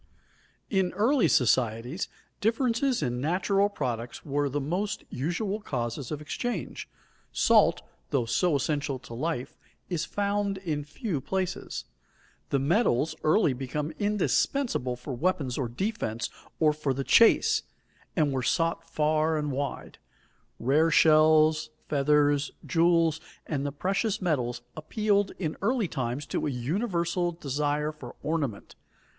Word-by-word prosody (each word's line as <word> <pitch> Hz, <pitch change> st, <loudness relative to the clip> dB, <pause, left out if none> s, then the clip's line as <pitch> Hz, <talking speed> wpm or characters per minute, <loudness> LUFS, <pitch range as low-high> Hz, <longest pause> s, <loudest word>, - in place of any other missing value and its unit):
In 190 Hz, -3 st, +1 dB
early 225 Hz, -, +3 dB
societies 125 Hz, -, +1 dB, 0.3 s
differences 235 Hz, -, +1 dB
in 125 Hz, -2 st, -1 dB
natural 195 Hz, +6 st, +2 dB
products 125 Hz, -, -4 dB
were 145 Hz, -1 st, 0 dB
the 145 Hz, +2 st, -1 dB
most 180 Hz, +8 st, -2 dB
usual 185 Hz, -, -2 dB
causes 120 Hz, -, -3 dB
of 150 Hz, -1 st, -4 dB
exchange. 230 Hz, +4 st, -4 dB, 0.4 s
Salt, -, -, +4 dB, 0.3 s
though 130 Hz, -4 st, +1 dB
so 160 Hz, +8 st, +2 dB
essential 145 Hz, 0 st, -1 dB
to 125 Hz, -2 st, -11 dB
life, 140 Hz, +1 st, -3 dB, 0.4 s
is 170 Hz, -3 st, -1 dB
found 200 Hz, -1 st, -1 dB
in 160 Hz, -6 st, -3 dB
few 150 Hz, -, -4 dB
places. 190 Hz, +4 st, -3 dB, 0.6 s
The 140 Hz, -, +2 dB
metals 155 Hz, -, +2 dB
early 155 Hz, -2 st, +4 dB
became 135 Hz, +4 st, -3 dB
indispensable 210 Hz, -, +1 dB
for 125 Hz, +3 st, -7 dB
weapons 140 Hz, -3 st, -1 dB
of 120 Hz, -3 st, -4 dB
defense 120 Hz, -, -2 dB, 0.3 s
or 155 Hz, -2 st, +4 dB
for 150 Hz, -3 st, -1 dB
the 135 Hz, -, -2 dB
chase, 230 Hz, -, +5 dB, 0.5 s
and 150 Hz, -4 st, +2 dB
were 130 Hz, -1 st, -1 dB
sought 165 Hz, +4 st, 0 dB
far 155 Hz, 0 st, +1 dB
and 150 Hz, -1 st, -1 dB
wide. 140 Hz, +1 st, -4 dB, 0.6 s
Rare 150 Hz, +7 st, +3 dB
shells, 155 Hz, 0 st, +5 dB, 0.2 s
feathers, 145 Hz, 0 st, +3 dB, 0.2 s
jewels, 165 Hz, -1 st, +3 dB, 0.2 s
and 145 Hz, -2 st, -2 dB
the -, -, -2 dB
precious 195 Hz, -, -1 dB
metals 125 Hz, -9 st, -1 dB
appealed 205 Hz, +5 st, 0 dB
in 160 Hz, -4 st, -3 dB
early 225 Hz, 0 st, +1 dB
times 130 Hz, -1 st, -3 dB
to -, -, -2 dB
a -, -, 0 dB
universal 170 Hz, -, -1 dB
desire 150 Hz, 0 st, -1 dB
for 135 Hz, -6 st, -11 dB
ornament. 145 Hz, -9 st, -2 dB
155 Hz, 125 wpm, -28 LUFS, 135-185 Hz, 0.6 s, chase